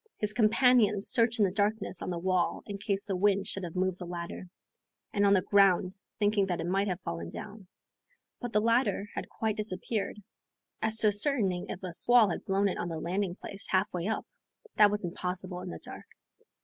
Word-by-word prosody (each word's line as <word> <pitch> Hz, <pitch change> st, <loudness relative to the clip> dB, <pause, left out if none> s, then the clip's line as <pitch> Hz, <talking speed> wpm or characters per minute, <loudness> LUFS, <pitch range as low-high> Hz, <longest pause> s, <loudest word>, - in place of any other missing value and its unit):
His 210 Hz, 0 st, -1 dB
companions 220 Hz, -2 st, +4 dB
searched 230 Hz, 0 st, +2 dB
in 210 Hz, -, +4 dB
the 185 Hz, -, 0 dB
darkness 205 Hz, -1 st, -1 dB
on -, -, -4 dB
the 175 Hz, -, -2 dB
wall, 185 Hz, 0 st, 0 dB
in 200 Hz, -1 st, -6 dB
case 200 Hz, 0 st, -2 dB
the 195 Hz, -, -2 dB
wind 200 Hz, +1 st, +2 dB
should 195 Hz, -2 st, -4 dB
have 170 Hz, -1 st, -6 dB
moved 185 Hz, 0 st, 0 dB
the 180 Hz, -, -6 dB
ladder, 175 Hz, +1 st, -6 dB, 0.6 s
and 205 Hz, -1 st, +3 dB
on 200 Hz, -, +5 dB
the 185 Hz, -, +2 dB
ground, 195 Hz, -2 st, +3 dB, 0.2 s
thinking 205 Hz, -1 st, +2 dB
that 175 Hz, -2 st, -2 dB
it -, -, -3 dB
might 195 Hz, +3 st, 0 dB
have 180 Hz, -2 st, -2 dB
fallen 85 Hz, -, -5 dB
down.... 210 Hz, -, -9 dB, 0.7 s
But 245 Hz, -2 st, -5 dB
the 210 Hz, -1 st, +2 dB
ladder 225 Hz, -3 st, +1 dB
had -, -, -5 dB
quite 220 Hz, -1 st, -2 dB
disappeared. 210 Hz, +1 st, -3 dB, 0.6 s
As 220 Hz, 0 st, +1 dB
to 215 Hz, -, +4 dB
ascertaining 205 Hz, -4 st, +1 dB
if 185 Hz, -, -6 dB
a 180 Hz, -2 st, -5 dB
squall 240 Hz, +3 st, +5 dB
had -, -, -5 dB
blown 195 Hz, +1 st, +2 dB
it 190 Hz, -, -3 dB
on 175 Hz, -, -3 dB
the 165 Hz, -1 st, -4 dB
landing 180 Hz, +2 st, -2 dB
place, 200 Hz, 0 st, -5 dB
half 190 Hz, +2 st, +1 dB
way 175 Hz, +1 st, -2 dB
up, 220 Hz, -, -2 dB, 0.5 s
that 210 Hz, -1 st, +6 dB
was 210 Hz, -2 st, 0 dB
impossible 180 Hz, +1 st, -3 dB
in -, -, -6 dB
the 80 Hz, -, -6 dB
dark. -, -, -10 dB
200 Hz, 205 wpm, -30 LUFS, 180-210 Hz, 0.7 s, that